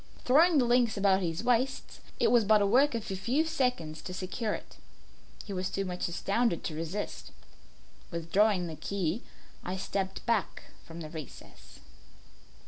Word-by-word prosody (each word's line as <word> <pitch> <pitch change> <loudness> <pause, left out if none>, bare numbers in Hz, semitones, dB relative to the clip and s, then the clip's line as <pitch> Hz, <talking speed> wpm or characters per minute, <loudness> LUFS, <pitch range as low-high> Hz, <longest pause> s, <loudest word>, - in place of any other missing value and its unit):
Throwing 315 +6 +5
the 255 - +4
links 240 -2 +3
about 195 -1 +3
his 165 +2 -2
waist, 250 +2 0 0.2
it - - +3
was 240 -2 +5
but 215 +1 +5
the 205 - +2
work 255 +6 +4
of 225 -3 -4
a - - -1
few 250 +11 +1
seconds 250 - -1
to 180 - -7
secure 200 +4 -2
it. - - -11 0.7
He 200 - -6
was 185 0 -2
too 195 - -2
much 180 -1 -3
astounded 195 +3 0
to 160 - -3
resist. 165 +6 -4 0.8
Withdrawing 180 +3 +2
the 160 -2 -5
key 180 +5 -2 0.4
I 185 +1 -3
stepped 190 0 -3
back 230 -4 0 0.2
from 165 0 -9
the 155 - -6
recess. 160 -3 -11
200 Hz, 160 wpm, -30 LUFS, 180-240 Hz, 0.8 s, Throwing